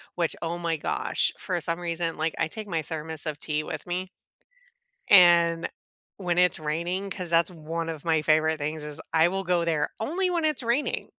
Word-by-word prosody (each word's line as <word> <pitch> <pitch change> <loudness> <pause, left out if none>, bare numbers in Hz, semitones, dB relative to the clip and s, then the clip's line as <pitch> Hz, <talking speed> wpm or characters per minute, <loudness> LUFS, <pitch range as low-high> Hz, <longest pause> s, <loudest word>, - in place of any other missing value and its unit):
which, 170 -2 0
oh, 170 +1 -2
my 165 -2 -1
gosh, - - 0
for 180 -2 -2
some 165 +2 -1
reason, 170 -1 -2
like, 160 +1 -1
I - - +2
take 215 +5 -7
my 165 -4 -1
thermos 160 0 -4
of 150 -2 -4
tea 150 0 -2
with - - -5
me 180 +1 -3 1.0
and, 170 -3 +6 0.5
when 175 -3 -1
it's 180 -1 +4
raining 175 +6 -2
'cause 180 -2 -4
that's 170 +2 +3
one 165 0 -4
of 160 -1 -6
my 160 -2 +2
favorite 155 +1 +3
things 150 +1 -4
is 150 +1 -8
I 160 +1 +5
will 195 +1 -2
go 175 -2 +1
there 155 -3 0
only 355 +11 0
when 340 -3 0
it's 300 -5 +1
raining 240 +5 0
170 Hz, 195 wpm, -26 LUFS, 160-180 Hz, 1.0 s, and